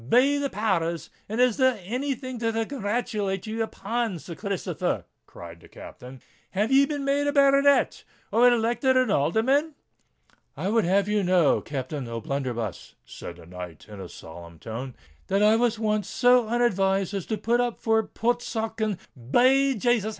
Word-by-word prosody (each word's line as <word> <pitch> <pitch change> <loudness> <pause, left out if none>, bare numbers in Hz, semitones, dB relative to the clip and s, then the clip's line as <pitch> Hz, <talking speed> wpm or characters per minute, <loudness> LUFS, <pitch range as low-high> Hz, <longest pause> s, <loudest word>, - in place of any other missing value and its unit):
Be 275 - +4
the 280 -1 -1
power 190 -6 0
rs! 170 - -10 0.2
and 220 +3 -3
is 250 -3 +3
there 260 -4 +3
any 260 +8 -2
thing 255 -1 -7
to 230 -1 0
congratulate 210 -5 -2
ye 220 +1 -5
upon, 225 -2 -2
Sir 170 +2 -9
Christopher?" 200 +1 -3 0.2
cried 85 -1 -11
the - - -17
Captain. 125 0 -12 0.3
"Have 210 +6 0
ye 275 +1 +5
been 285 -2 -3
made 285 +1 +1
a - - +2
baronet—or 275 -3 +3
elected 240 +3 +2
an 255 -5 +2
alderman?" 260 - +1 0.8
"I 190 - -2
would 225 -1 +2
have 195 +2 +2
you 210 0 +1
know, 180 -5 +3
Captain 135 -1 -5
O'Blunderbuss," 115 -2 -4
said - - -9
the 85 -1 -15
knight, 90 -1 -9
in 105 -2 -10
a 90 - -8
solemn 85 +1 -11
tone, 115 - -7 0.3
"that 195 +2 +2
I 215 +1 +5
was 235 -1 +1
once 215 -2 -1
so 245 -2 +4
unadvised 195 -5 +1
as 195 -4 -4
to 220 - -2
put 235 +3 +1
up 245 -2 -2
for 225 -1 +2
Portsoken——" 225 -2 -2 0.3
Be 265 - +4
Jasus! 230 -1 +1
220 Hz, 165 wpm, -25 LUFS, 170-245 Hz, 0.8 s, ye